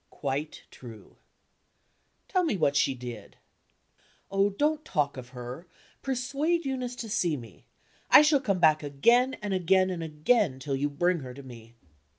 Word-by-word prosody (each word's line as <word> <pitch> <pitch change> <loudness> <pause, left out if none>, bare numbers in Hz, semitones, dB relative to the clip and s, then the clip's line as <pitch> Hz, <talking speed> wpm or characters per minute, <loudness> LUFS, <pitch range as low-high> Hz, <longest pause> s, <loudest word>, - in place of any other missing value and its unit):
"Quite 145 +2 -4
true." 115 -4 -13 1.1
"Tell 370 -2 +1
me 310 - 0
what 145 -4 +1
she 135 - +2
did. 120 -4 -9 0.9
"Oh, 195 +1 +2
don't 300 +9 0
talk 150 - -1
of 125 -2 -9
her! 125 +6 -9 0.3
Persuade 280 +6 -1
Eunice 255 -2 -3
to 235 - -6
see 175 -7 0
me. 115 -6 -13 0.4
I - - +9
shall 300 -2 +3
come 200 -8 0
back 155 -3 +4
again, 235 - +2
and 205 -2 -2
again, 185 +1 +2
and 175 -2 -4
again 160 - +1
till 135 +1 -3
you 145 +2 -1
bring 175 +5 0
her 130 -3 -9
to 140 - -10
me." 115 -2 -13
165 Hz, 160 wpm, -28 LUFS, -, 1.1 s, I